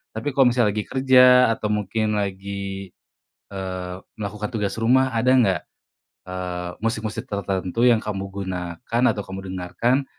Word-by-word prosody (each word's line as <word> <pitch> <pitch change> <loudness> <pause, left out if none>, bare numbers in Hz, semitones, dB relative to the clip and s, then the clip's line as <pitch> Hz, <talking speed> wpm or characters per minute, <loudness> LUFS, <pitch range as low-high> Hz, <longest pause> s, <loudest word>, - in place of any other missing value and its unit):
Tapi 130 +6 -3
kalau 135 -2 +5
misalnya 120 -3 +2
lagi 105 - -1
kerja 125 -2 +6
atau 110 -1 -3
mungkin 105 +1 0
lagi, 100 -1 -4 0.6
eee, 95 -2 -5 0.2
melakukan 105 +1 -4
tugas 105 -4 -2
rumah, 130 +3 +3
ada 120 +3 +3
gak, 105 -9 +3 0.7
eee, 90 -1 -4
musik-musik 110 -1 -2
tertentu 100 +2 -1
yang 115 -2 +4
kamu 100 -2 -3
gunakan 95 +4 -3
atau 105 - -4
kamu 95 0 -7
dengarkan 95 +9 0
105 Hz, 135 wpm, -23 LUFS, 95-120 Hz, 0.7 s, kerja